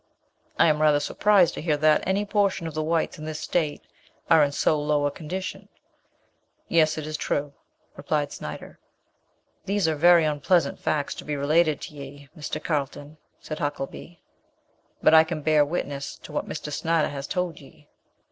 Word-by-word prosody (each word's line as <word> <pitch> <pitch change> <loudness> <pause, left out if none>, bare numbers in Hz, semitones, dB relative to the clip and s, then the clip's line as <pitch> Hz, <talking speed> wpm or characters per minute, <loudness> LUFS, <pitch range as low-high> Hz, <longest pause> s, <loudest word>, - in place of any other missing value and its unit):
'" - - -46
"I - - +5
am 155 -2 +2
rather 150 -1 +4
surprised 195 +3 +3
to - - -6
hear 155 -2 +1
that 155 +1 +4
any 195 +2 +1
portion 200 -4 0
of 160 - -5
the 155 - -2
whites 165 +2 -1
in 155 - -7
this 155 -1 -5
state 155 -4 -1 0.5
are 160 -2 +7
in 145 - +1
so 150 +1 +1
low 150 -1 +1
a 145 - +1
condition." 185 +6 -6 1.0
"Yet 160 -2 +3
it 155 - -4
is 155 0 -4
true," 145 -1 -2 0.4
returned 145 -2 -2
Snyder. 75 - -8 0.9
"These 200 -3 +1
are 160 - +2
very 170 +2 +5
onpleasant 150 +1 +1
facts 145 -2 -1
to - - -9
be 150 - -3
related 155 +2 +2
to - - -8
ye, 140 -1 -11
Mr. 155 0 -5
Carlton," 145 0 -3 0.2
said 155 - -7
Huckelby; 145 +4 -5 0.8
"but - - +6
I 160 0 +9
can 160 -2 -5
bear 155 -1 +4
witness 145 -2 -4
to - - -10
what - - -3
Mr. 150 - -5
Snyder 160 +2 +1
has 140 0 -6
told 180 -4 -2
ye." 145 +1 -18
155 Hz, 175 wpm, -25 LUFS, 145-170 Hz, 1.0 s, I